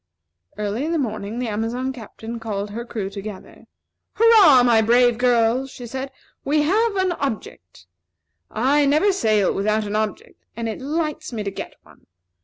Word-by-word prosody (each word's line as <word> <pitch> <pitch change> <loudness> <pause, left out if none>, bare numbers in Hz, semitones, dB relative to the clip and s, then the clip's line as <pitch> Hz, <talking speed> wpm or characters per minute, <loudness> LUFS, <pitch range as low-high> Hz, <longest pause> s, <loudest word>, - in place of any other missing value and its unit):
Early 210 +4 -2
in 325 +2 -2
the - - +1
morning, 220 -5 -3
the 250 -1 -2
Amazon 235 +5 -2
Captain 230 -1 -8
called 205 -2 -4
her 235 +3 -5
crew 215 -5 -4
together. 200 0 -9 0.5
"Hurrah, 415 - +6
my 235 -2 +4
brave 240 +1 +3
girls!" 245 +1 +2
she 245 - -10
said. 265 +3 -5 0.3
"We 295 +2 +1
have 420 +7 +1
an 375 -1 +1
object. 210 - -6 0.6
I 280 +5 +2
never 310 +9 +3
sail 215 - +1
without 215 +2 0
an 205 0 -4
object, 215 -1 -4
and 230 0 -4
it 220 - -5
lights 305 +1 -3
me 220 -3 -4
to 200 - -3
get 195 - -8
one. - - -22
235 Hz, 165 wpm, -22 LUFS, 215-280 Hz, 0.6 s, Hurrah